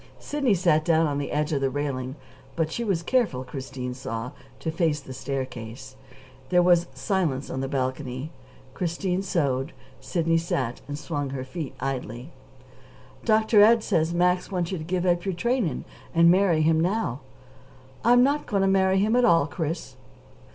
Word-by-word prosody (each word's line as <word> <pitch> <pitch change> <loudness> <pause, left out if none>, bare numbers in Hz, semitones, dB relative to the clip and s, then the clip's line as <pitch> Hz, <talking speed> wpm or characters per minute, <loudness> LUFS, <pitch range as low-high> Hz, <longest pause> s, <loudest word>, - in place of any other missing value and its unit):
Sidney 275 -8 0
sat 170 -4 +3
down 165 -1 +3
on 145 -2 -1
the 140 - -4
edge 150 +1 0
of 140 - 0
the 135 - +2
railing; 130 -2 -3 0.4
but 160 -1 0
she 235 - -2
was 190 -7 0
careful, 205 - +1
Christine 130 -1 -6
saw, 120 -1 -5 0.3
to 160 - -3
face 160 -2 +1
the 135 -2 -10
staircase. 130 -2 -6 0.5
There 180 -1 +4
was 175 -1 +4
silence 170 -10 -1
on 130 - -3
the 135 - -2
balcony. 130 +1 -3 0.4
Christine 180 +1 -1
sewed; 140 -6 -1 0.3
Sidney 165 -1 +1
sat 130 -7 -2
and 145 0 -4
swung 145 -2 -3
her 130 -1 -4
feet 140 +1 -6
idly. 125 +1 -4 0.9
"Dr. 220 -1 +4
Ed 225 +1 +6
says 160 0 +1
Max 180 +2 +1
wants 180 -2 -1
you 185 - -2
to - - -6
give 180 +2 -1
up 175 -1 +2
your 190 -2 -2
training 225 - -1 0.3
and 170 +1 +7
marry 180 -4 +3
him 160 0 +3
now." 175 - 0 0.8
"I'm 245 +2 +6
not 285 +3 +1
going 200 -2 +1
to - - +3
marry 190 0 +3
him 210 +4 +2
at 250 - +4
all, 165 -8 +5
Chris." 160 +2 -4
165 Hz, 170 wpm, -25 LUFS, 135-185 Hz, 0.9 s, and